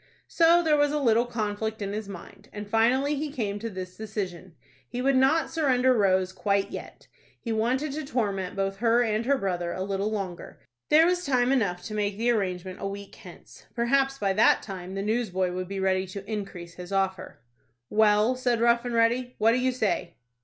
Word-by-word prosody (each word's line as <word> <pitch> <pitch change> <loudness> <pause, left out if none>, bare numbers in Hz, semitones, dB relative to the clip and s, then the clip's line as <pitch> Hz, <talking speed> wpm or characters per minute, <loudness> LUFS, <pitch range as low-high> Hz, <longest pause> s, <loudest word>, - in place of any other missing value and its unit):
So 340 0 +4
there 310 -2 +3
was 290 0 +3
a 300 - 0
little 235 -2 +3
conflict 220 -1 -3
in 200 -1 -4
his 210 -1 -5
mind, 180 -4 -11
and 210 -1 -7
finally 245 +7 +2
he 295 0 -3
came 205 -6 -3
to 230 +2 -4
this 185 -2 -7
decision. 190 -5 -6 0.3
He 245 - -5
would 270 +2 +2
not 270 +3 +3
surrender 260 -5 +3
Rose 190 -4 +2
quite 200 0 0
yet. - - -9 0.3
He 230 - -3
wanted 255 +7 0
to 310 +3 -4
torment 200 -8 -2
both 195 0 -2
her 235 +2 +3
and 220 +1 -1
her 280 0 +3
brother 175 -5 -2
a 185 - -3
little 200 +1 -1
longer. 195 -5 -5 0.3
There 315 +2 +6
was 355 0 +1
time 255 -3 +2
enough 190 -9 0
to 215 - -7
make 205 -1 -1
the 235 +2 +2
arrangement 185 -4 -2
a 195 - -2
week 200 0 -8
hence. - - -14
Perhaps 270 +3 +1
by 200 -6 0
that 215 +3 +4
time 190 -2 -7
the 195 - -2
newsboy 205 -5 0
would 185 0 -4
be 195 +1 -5
ready 190 0 +1
to 195 +1 -8
increase 195 -5 -6
his 180 +1 -10
offer. 190 -5 -2 0.5
"Well," 215 +3 +4
said 250 -2 0
Rough 235 0 +3
and 240 -1 -2
Ready, 245 +2 +1
"what 220 +1 +4
do 245 - +2
you 255 +1 +1
say?" 185 -8 -2
215 Hz, 200 wpm, -26 LUFS, 195-250 Hz, 0.5 s, There